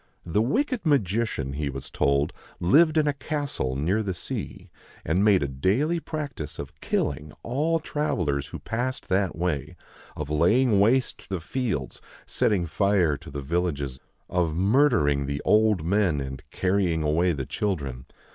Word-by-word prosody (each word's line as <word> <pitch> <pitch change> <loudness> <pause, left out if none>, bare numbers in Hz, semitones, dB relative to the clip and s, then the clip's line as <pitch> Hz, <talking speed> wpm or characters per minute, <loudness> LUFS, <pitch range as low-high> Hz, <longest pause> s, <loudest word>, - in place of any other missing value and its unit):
The 85 +5 +1
wicked 250 - 0
magician, 115 - 0
he 75 0 -2
was 70 -1 -7
told, 70 +1 +1 0.3
lived 155 - +5
in 155 - +4
a 145 - +2
castle 140 - -3
near 85 +11 +1
the 95 -4 -3
sea, - - -6 0.3
and 90 +5 +2
made 100 -6 +5
a - - 0
daily 105 - +1
practice 145 - -5
of - - -7
killing 75 +1 -2
all 155 +7 0
travellers 85 - -1
who - - -7
passed 125 +3 -3
that 95 -2 +1
way, 80 -1 -2 0.4
of 75 - -4
laying 100 - +3
waste 125 +6 +2
the 95 -2 -2
fields, 90 - -3 0.2
setting 95 -5 +1
fire 90 -2 +2
to - - -12
the 70 0 -6
villages, 70 -4 -2 0.3
of 85 -3 0
murdering 95 - +3
the 70 0 -2
old 105 -6 +3
men 95 -4 +2
and 65 -1 -5
carrying 90 -4 +1
away 85 +4 +2
the 70 -5 -3
children. 70 -12 -3
90 Hz, 150 wpm, -26 LUFS, 75-120 Hz, 0.4 s, lived